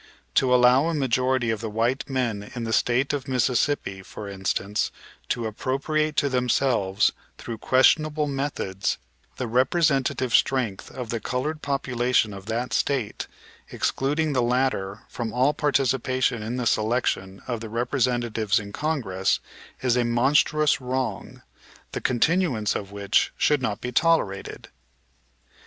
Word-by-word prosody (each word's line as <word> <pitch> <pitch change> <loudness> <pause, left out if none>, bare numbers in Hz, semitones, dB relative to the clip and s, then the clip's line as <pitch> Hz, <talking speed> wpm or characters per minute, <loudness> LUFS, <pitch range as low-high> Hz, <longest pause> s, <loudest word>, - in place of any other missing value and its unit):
To 130 -2 +3
allow 125 +4 +5
a 170 - -1
majority 130 -3 +1
of 110 -1 -3
the 110 - -3
white 115 +6 -1
men 115 -6 -2
in 120 - -3
the 115 -1 -2
State 125 +5 +2
of 140 -2 -3
Mississippi, 125 -5 0
for 100 +2 -9
instance, 100 +1 -1 0.4
to 120 - -1
appropriate 140 +7 -1
to 140 - +3
themselves 125 -6 +2 0.3
through 115 -2 -7
questionable 150 +5 +3
methods 135 -9 -2 0.4
the 125 - -2
representative 130 0 +1
strength 120 -8 +1
of 125 -4 -6
the 115 - -1
colored 140 +8 -3
population 125 -5 0
of 100 0 -10
that 115 +3 -2
State, 130 -7 -1 0.4
excluding 150 +3 0
the 130 - +2
latter 120 -5 0
from 115 -2 -4
all 130 +5 +2
participation 130 -4 +1
in 110 +3 -4
the 125 -1 -2
selection 110 -4 0
of 120 -3 -2
the 110 - -6
representatives 120 -3 0
in 100 -1 -8
Congress, 105 -10 0 0.4
is 125 -2 +3
a 125 - +2
monstrous 135 +5 +2
wrong, 130 0 -3 0.5
the - - -4
continuance 130 - +1
of 100 -1 -5
which 100 0 +1
should 150 -2 +2
not 105 -5 -2
be 125 - -4
tolerated. 125 -10 0
125 Hz, 135 wpm, -25 LUFS, 110-135 Hz, 0.5 s, allow